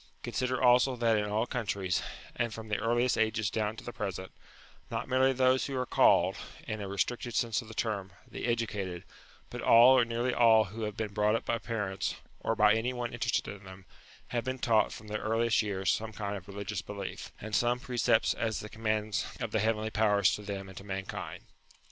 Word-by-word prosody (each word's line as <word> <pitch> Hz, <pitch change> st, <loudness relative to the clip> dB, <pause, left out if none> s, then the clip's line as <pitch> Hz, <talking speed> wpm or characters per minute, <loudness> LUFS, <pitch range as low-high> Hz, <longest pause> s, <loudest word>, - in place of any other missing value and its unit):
Consider 130 Hz, 0 st, -1 dB
also 125 Hz, +1 st, +5 dB
that 115 Hz, -2 st, +2 dB
in 105 Hz, -1 st, +1 dB
all 110 Hz, +3 st, +1 dB
countries, 100 Hz, -7 st, -1 dB, 0.3 s
and 120 Hz, -1 st, -1 dB
from 110 Hz, 0 st, -8 dB
the 105 Hz, -, 0 dB
earliest 120 Hz, +3 st, +1 dB
ages 110 Hz, -1 st, +1 dB
down 110 Hz, -1 st, -1 dB
to -, -, -10 dB
the 120 Hz, -, -7 dB
present, 95 Hz, -3 st, -5 dB, 0.6 s
not -, -, -3 dB
merely 130 Hz, +1 st, +3 dB
those 130 Hz, 0 st, +2 dB
who 135 Hz, -2 st, -3 dB
are 125 Hz, -, 0 dB
called, -, -, +4 dB, 0.3 s
in 110 Hz, -1 st, -3 dB
a 100 Hz, -, -4 dB
re 100 Hz, +1 st, -6 dB
stricted 120 Hz, +4 st, -1 dB
sense 115 Hz, 0 st, +1 dB
of 115 Hz, -, -13 dB
the 110 Hz, -, -10 dB
term, 100 Hz, -4 st, -2 dB, 0.2 s
the -, -, -6 dB
educated, 105 Hz, -7 st, -2 dB, 0.5 s
but -, -, -5 dB
all 120 Hz, +3 st, +7 dB
or -, -, +5 dB
nearly 120 Hz, +2 st, -1 dB
all 115 Hz, -2 st, +6 dB
who 110 Hz, +3 st, -5 dB
have 105 Hz, -1 st, -5 dB
been 105 Hz, -2 st, -3 dB
brought 105 Hz, +1 st, +2 dB
up -, -, -2 dB
by 115 Hz, -, 0 dB
parents, 105 Hz, -5 st, -2 dB, 0.2 s
or 115 Hz, -, -1 dB
by 105 Hz, -1 st, +5 dB
any 115 Hz, +3 st, 0 dB
one 120 Hz, -1 st, -4 dB
interested 120 Hz, 0 st, -1 dB
in 100 Hz, -1 st, -8 dB
them, 95 Hz, 0 st, -12 dB, 0.4 s
have 120 Hz, -1 st, -1 dB
been 130 Hz, +2 st, -3 dB
taught 115 Hz, -3 st, +2 dB
from 110 Hz, -, -10 dB
their 105 Hz, 0 st, -3 dB
earliest 115 Hz, +1 st, +2 dB
years 95 Hz, -3 st, 0 dB
some 110 Hz, 0 st, -2 dB
kind 105 Hz, -2 st, -4 dB
of 95 Hz, -1 st, -9 dB
religious 100 Hz, 0 st, -4 dB
belief, 100 Hz, -1 st, -7 dB
and 110 Hz, 0 st, -4 dB
some 120 Hz, +4 st, +2 dB
precepts 120 Hz, -3 st, +2 dB
as 110 Hz, -2 st, -2 dB
the 105 Hz, -, -7 dB
commands 110 Hz, -3 st, -1 dB
of 115 Hz, -3 st, -3 dB
the 110 Hz, -, +1 dB
heavenly 110 Hz, 0 st, 0 dB
powers 105 Hz, -3 st, +3 dB
to -, -, -4 dB
them 100 Hz, -1 st, -5 dB
and 95 Hz, -1 st, -9 dB
to -, -, -12 dB
mankind. 95 Hz, -1 st, -5 dB
110 Hz, 210 wpm, -30 LUFS, 100-120 Hz, 0.6 s, all